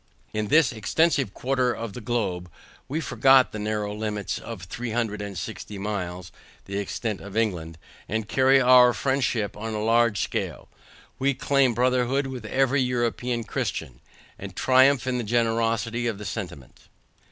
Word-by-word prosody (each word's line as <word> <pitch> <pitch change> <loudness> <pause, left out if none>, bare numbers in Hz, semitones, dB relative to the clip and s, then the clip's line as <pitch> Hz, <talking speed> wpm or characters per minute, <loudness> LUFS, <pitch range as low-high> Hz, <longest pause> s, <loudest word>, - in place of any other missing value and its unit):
In 110 -1 -1
this 155 +3 +4
extensive 135 - +1
quarter 130 -1 +1
of 115 -3 -5
the 125 - -7
globe, 100 -6 -2 0.4
we 145 +5 -2
forget 130 -2 +4
the 105 - -6
narrow 105 -1 -2
limits 105 -1 -3
of 110 -6 -8
three 120 +7 -5
hundred 110 -2 -2
and 100 -2 -6
sixty 105 +3 -6
miles 90 -4 -4 0.3
(the 100 +1 -3
extent 105 +1 -3
of 100 +1 -7
England) 85 -8 -1 0.3
and 110 0 -2
carry 135 +2 +4
our 125 -1 +7
friendship 125 -4 0
on 110 +1 -5
a 105 - -2
larger 115 0 +3
scale; - - -3 0.5
we 140 +1 +1
claim 135 -2 +2
brotherhood 125 +2 +1
with 130 -4 -6
every 135 +4 +2
European 120 -1 -1
christian, 65 - -4 0.4
and - - -8
triumph 130 0 +4
in 125 -1 -1
the - - -2
generosity 115 +1 0
of 110 -4 -2
the 105 - -8
sentiment. 90 - -7
115 Hz, 155 wpm, -25 LUFS, 105-130 Hz, 0.5 s, our